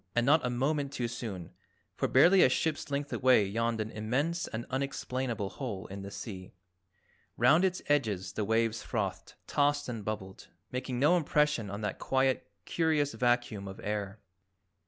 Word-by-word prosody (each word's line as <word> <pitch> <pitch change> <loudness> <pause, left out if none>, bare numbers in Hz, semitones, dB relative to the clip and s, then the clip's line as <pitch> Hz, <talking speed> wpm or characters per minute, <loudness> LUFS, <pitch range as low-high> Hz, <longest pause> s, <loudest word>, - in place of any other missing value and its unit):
And 120 0 +3
not 150 +4 +5
a 125 - 0
moment 140 +3 0
too 125 -4 -2
soon, 100 -7 -6 0.4
for - - -1
barely 175 +8 +6
a - - +7
ship's 150 +4 -1
length 140 0 -2
away 125 -5 +4
yawned 115 +3 -1
an 110 +1 -3
immense 135 +11 -1
and 115 +2 -5
unexplainable 130 -5 -2
hole 105 -8 -4
in 100 +1 -7
the 100 - -7
sea. 95 -3 -8 0.8
Round 140 +9 +5
its 185 -1 0
edges 105 -11 0
the 110 - -2
waves 115 +1 +1
frothed, - - -3
tossed 145 0 +1
and 115 -4 -5
bubbled, 100 -3 -6 0.2
making 125 0 -3
no 150 +7 +5
impression 150 - +1
on 100 +2 -5
that 105 -2 -3
quiet 130 -1 +1 0.2
curious 155 -3 +1
vacuum 120 -5 0
of 95 - -8
air. 105 0 -3
120 Hz, 160 wpm, -30 LUFS, 105-145 Hz, 0.8 s, a